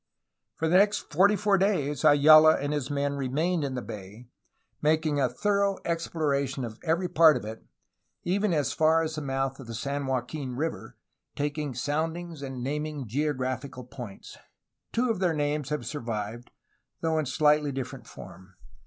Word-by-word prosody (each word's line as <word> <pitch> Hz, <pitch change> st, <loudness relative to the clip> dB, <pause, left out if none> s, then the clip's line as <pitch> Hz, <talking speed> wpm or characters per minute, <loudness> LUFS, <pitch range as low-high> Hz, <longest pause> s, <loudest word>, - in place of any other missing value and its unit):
For 160 Hz, -, -1 dB
the 175 Hz, +3 st, +5 dB
next 205 Hz, -3 st, +2 dB
forty 200 Hz, +6 st, +5 dB
four 205 Hz, -1 st, +2 dB
days 150 Hz, -8 st, 0 dB
Ayala 155 Hz, +1 st, +7 dB
and 145 Hz, +1 st, -2 dB
his 145 Hz, -2 st, -2 dB
men 140 Hz, 0 st, -1 dB
remained 155 Hz, +6 st, 0 dB
in 135 Hz, -2 st, -3 dB
the 125 Hz, -, -4 dB
bay, 105 Hz, +4 st, -10 dB, 0.5 s
making 155 Hz, -1 st, +2 dB
a 130 Hz, -2 st, +2 dB
thorough 200 Hz, -1 st, +1 dB
exploration 140 Hz, -6 st, -1 dB
of 110 Hz, -1 st, -9 dB
every 170 Hz, +2 st, +1 dB
part 160 Hz, -3 st, +6 dB
of -, -, -7 dB
it, 110 Hz, +1 st, -8 dB, 0.6 s
even 200 Hz, +3 st, +1 dB
as 150 Hz, -4 st, 0 dB
far 160 Hz, +1 st, +3 dB
as 160 Hz, 0 st, -3 dB
the 155 Hz, -, -4 dB
mouth 135 Hz, -1 st, -2 dB
of 135 Hz, -, -10 dB
the 115 Hz, -, -6 dB
San 140 Hz, +4 st, -3 dB
Joaquin 130 Hz, 0 st, -3 dB
River, 160 Hz, +5 st, -4 dB, 0.4 s
taking 145 Hz, -2 st, -3 dB
soundings 160 Hz, +4 st, -3 dB
and 130 Hz, -3 st, -5 dB
naming 150 Hz, -1 st, -3 dB
geographical 130 Hz, 0 st, -2 dB
points. 120 Hz, -5 st, -10 dB, 0.5 s
Two 240 Hz, 0 st, +1 dB
of 215 Hz, -, -3 dB
their 175 Hz, -4 st, +1 dB
names 145 Hz, -1 st, -1 dB
have 150 Hz, 0 st, -3 dB
survived, 115 Hz, -4 st, -5 dB, 0.5 s
though 160 Hz, -1 st, +1 dB
in 155 Hz, -, -2 dB
slightly 150 Hz, +1 st, +3 dB
different 130 Hz, -1 st, -6 dB
form. 95 Hz, +1 st, -12 dB
145 Hz, 160 wpm, -27 LUFS, 130-160 Hz, 0.6 s, Ayala